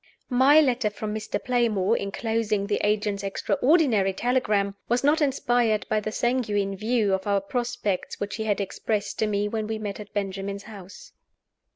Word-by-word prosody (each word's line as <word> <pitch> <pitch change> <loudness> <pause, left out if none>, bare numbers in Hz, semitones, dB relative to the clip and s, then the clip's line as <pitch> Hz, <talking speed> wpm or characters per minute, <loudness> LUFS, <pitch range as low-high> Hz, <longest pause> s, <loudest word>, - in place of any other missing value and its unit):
MY 270 +5 +6
letter 250 -6 +1
from 210 0 -5
Mr. 215 -1 -3
Playmore, 230 -4 +1
inclosing 215 0 -1
the 205 0 -1
agent's 210 -1 0
extraordinary 220 - +2
telegram, 210 -3 +1 0.2
was 240 +2 +1
not 300 +3 +3
inspired 240 -7 +1
by 215 - +2
the 215 +1 -4
sanguine 215 -5 0
view 215 0 +1
of 190 +1 -2
our 200 -1 +3
prospects 235 -2 -3
which 205 +2 -4
he 220 - -3
had 210 -2 0
expressed 205 +1 -3
to 220 - +2
me 205 0 0
when 215 0 -3
we 220 0 -2
met 210 -2 -5
at 210 -1 -9
Benjamin's 200 0 -4
house. 210 - -12
215 Hz, 165 wpm, -25 LUFS, 200-240 Hz, 0.2 s, MY